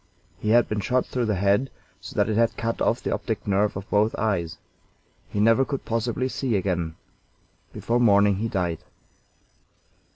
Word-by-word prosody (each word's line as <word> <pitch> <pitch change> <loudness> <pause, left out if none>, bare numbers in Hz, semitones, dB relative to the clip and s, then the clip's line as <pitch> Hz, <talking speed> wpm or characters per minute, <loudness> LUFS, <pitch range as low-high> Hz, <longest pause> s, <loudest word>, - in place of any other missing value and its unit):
He 105 - -2
had 120 +1 +5
been 105 - -2
shot 125 +5 0
through 125 -3 -2
the 105 - +1
head, 100 +7 +2 0.3
so - - -10
that 105 -1 +2
it 110 - -1
had 115 0 +2
cut 115 +2 -2
off - - +1
the - - -1
optic - - -3
nerve 100 0 +1
of 100 +1 -7
both 105 +2 +2
eyes. 90 -6 -1 0.7
He 105 - -3
never 115 +5 +4
could 140 0 -4
possibly 115 +2 -1
see 130 -3 -2
again. 90 -4 -1 0.8
Before 120 +1 -1
morning 100 -4 +4
he 110 +3 -1
died. 90 -7 -2
105 Hz, 170 wpm, -24 LUFS, 100-115 Hz, 0.8 s, had